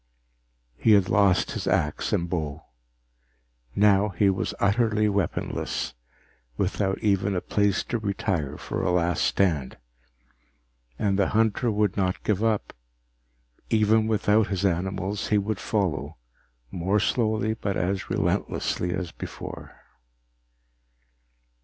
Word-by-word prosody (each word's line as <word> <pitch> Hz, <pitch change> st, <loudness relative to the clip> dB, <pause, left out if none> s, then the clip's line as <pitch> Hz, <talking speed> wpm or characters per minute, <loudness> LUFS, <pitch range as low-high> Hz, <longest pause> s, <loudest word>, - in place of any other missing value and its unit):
He 110 Hz, -, +5 dB
had 100 Hz, -3 st, +4 dB
lost 100 Hz, -4 st, +2 dB
axe 75 Hz, -, 0 dB
and 85 Hz, -, 0 dB
bow. 80 Hz, -4 st, -3 dB, 1.1 s
Now 105 Hz, 0 st, +4 dB
he 100 Hz, +1 st, +2 dB
was 95 Hz, -, -3 dB
utterly 105 Hz, +1 st, +2 dB
weaponless, 100 Hz, -10 st, -2 dB, 0.6 s
without 95 Hz, 0 st, 0 dB
even 100 Hz, -1 st, +1 dB
a -, -, +1 dB
place 100 Hz, +1 st, +1 dB
to 120 Hz, -, -3 dB
retire 95 Hz, -8 st, -2 dB
for -, -, -4 dB
a -, -, 0 dB
last 90 Hz, -1 st, +1 dB
stand. 80 Hz, -9 st, +1 dB, 1.2 s
And 100 Hz, -1 st, 0 dB
the 100 Hz, -, +3 dB
hunter 115 Hz, +2 st, +2 dB
would 105 Hz, -2 st, 0 dB
not 95 Hz, -2 st, -1 dB
give 105 Hz, 0 st, 0 dB
up. 110 Hz, -2 st, 0 dB, 1.0 s
Even 110 Hz, 0 st, +3 dB
without 110 Hz, 0 st, +2 dB
his 100 Hz, 0 st, -1 dB
animals, 95 Hz, +3 st, -1 dB
he 105 Hz, -, +2 dB
would 105 Hz, 0 st, -1 dB
follow, 85 Hz, -, -2 dB, 0.5 s
more 95 Hz, +4 st, 0 dB
slowly 110 Hz, -1 st, +1 dB
but 100 Hz, -3 st, -3 dB
as 95 Hz, +1 st, -2 dB
relentlessly 90 Hz, 0 st, -1 dB
as 90 Hz, -2 st, -4 dB
before. -, -, -9 dB
100 Hz, 115 wpm, -26 LUFS, 90-105 Hz, 1.2 s, He